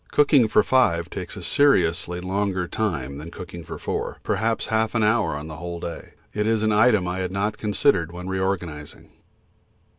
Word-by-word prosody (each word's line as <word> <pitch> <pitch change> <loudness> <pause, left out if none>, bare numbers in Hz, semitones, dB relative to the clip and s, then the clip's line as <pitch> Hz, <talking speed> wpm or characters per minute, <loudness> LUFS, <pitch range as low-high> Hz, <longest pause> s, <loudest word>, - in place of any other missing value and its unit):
Cooking 145 -5 +5
for 105 - +4
five 100 -11 +2
takes - - -6
a - - -7
seriously 90 - +2
longer 95 0 -1
time 70 - -2
than 80 +3 -8
cooking 85 0 -9
for - - -7
four; - - -3
perhaps 110 +3 0
half 110 +1 +1
an 115 - +2
hour 110 -5 +2
on 75 - -7
the 80 -1 -8
whole 85 0 -6
day. 85 - -7 0.2
It 105 0 0
is 110 -1 +1
an 110 - +2
item 105 -3 +4
I 90 +1 -2
had 90 -1 -2
not 105 +2 -2
considered 100 - +2
when 90 +1 -7
re 95 0 -2
organising. 85 -6 -4
95 Hz, 185 wpm, -24 LUFS, 85-110 Hz, 0.2 s, Cooking